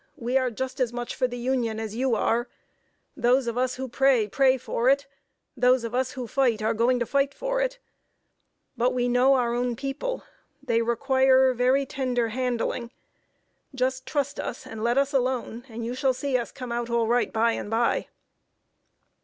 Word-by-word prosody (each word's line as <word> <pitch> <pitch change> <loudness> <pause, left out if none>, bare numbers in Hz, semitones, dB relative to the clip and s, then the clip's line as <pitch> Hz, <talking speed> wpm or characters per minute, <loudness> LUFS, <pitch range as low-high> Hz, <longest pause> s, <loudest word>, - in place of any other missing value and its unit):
We 245 +2 -3
are 260 -1 +3
just 260 +3 -5
as 250 -3 +1
much 240 0 -4
for 255 - 0
the 245 0 -6
Union 240 -3 -1
as 220 -1 -5
you 255 0 +1
are. 235 +3 +1 0.7
Those 250 +2 +2
of 235 -1 -2
us 255 0 0
who 265 +1 -5
pray, 255 -3 +3
pray 260 +4 +3
for 245 0 0
it; 280 +1 +3 0.5
those 250 0 +3
of 230 0 -5
us 255 0 0
who 255 -2 -5
fight, 240 -2 +1
are 220 +1 +2
going 235 +3 +2
to 240 - -1
fight 280 +2 0
for - - -1
it. - - -1 1.0
But 250 +1 +1
we 245 -1 +1
know 250 +3 +4
our 240 -2 +1
own 245 0 -1
people. 275 - -4 0.4
They 230 -4 +1
require 260 +2 +3
very 255 +3 +2
tender 250 -3 -1
handling. 240 0 -2 0.9
Just 260 0 -1
trust 280 -1 -2
us 245 - -5
and 220 -1 -7
let 240 +2 +1
us 280 +1 +2
alone, 250 -2 -1
and 230 0 -6
you 240 - -3
shall 260 0 +1
see 275 0 -2
us 240 -2 -1
come 250 -3 -7
out 235 0 -2
all 235 -1 +1
right 240 +2 +1
by 225 +1 +2
and 205 - -4
by." 230 +2 +1
250 Hz, 185 wpm, -26 LUFS, 235-265 Hz, 1.0 s, know